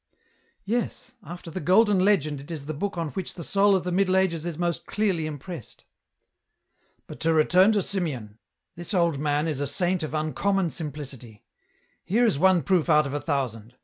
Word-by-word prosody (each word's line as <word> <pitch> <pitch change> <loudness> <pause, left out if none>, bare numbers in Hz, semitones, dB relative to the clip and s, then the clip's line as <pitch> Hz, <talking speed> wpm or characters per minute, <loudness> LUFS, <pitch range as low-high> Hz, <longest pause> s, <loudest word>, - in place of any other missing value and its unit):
" - - -40 0.2
Yes; 240 +3 -3
after 175 -2 -9
the 185 - -4
Golden 195 +4 +4
Legend 155 -8 +2
it 140 - -14
is 155 -4 -6
the 155 - -4
book 195 +5 -3
on 165 -2 -2
which 185 +3 -5
the 170 - -7
soul 200 +3 +3
of 185 - 0
the 180 - -3
Middle 185 +1 +2
Ages 170 -3 0
is 165 -3 -4
most 175 -1 -2
clearly 190 -7 0
impressed." 155 - -8 0.6
" - - -45
But - - -10
to 165 0 +1
return 180 +6 +5
to 205 -3 +1
Simeon; 130 - -4 0.4
this 175 +4 -4
old 170 -5 +2
man 150 +1 0
is 150 -4 -2
a 145 - -1
saint 180 +4 0
of 155 0 -4
uncommon 175 +4 0
simplicity. 135 -8 -8 0.6
Here 225 +7 +2
is 195 -11 +1
one 185 -1 +4
proof 180 -3 +1
out 150 -1 +5
of 140 - -4
a 145 - -2
thousand. 125 -6 -3
170 Hz, 195 wpm, -25 LUFS, 145-190 Hz, 0.6 s, return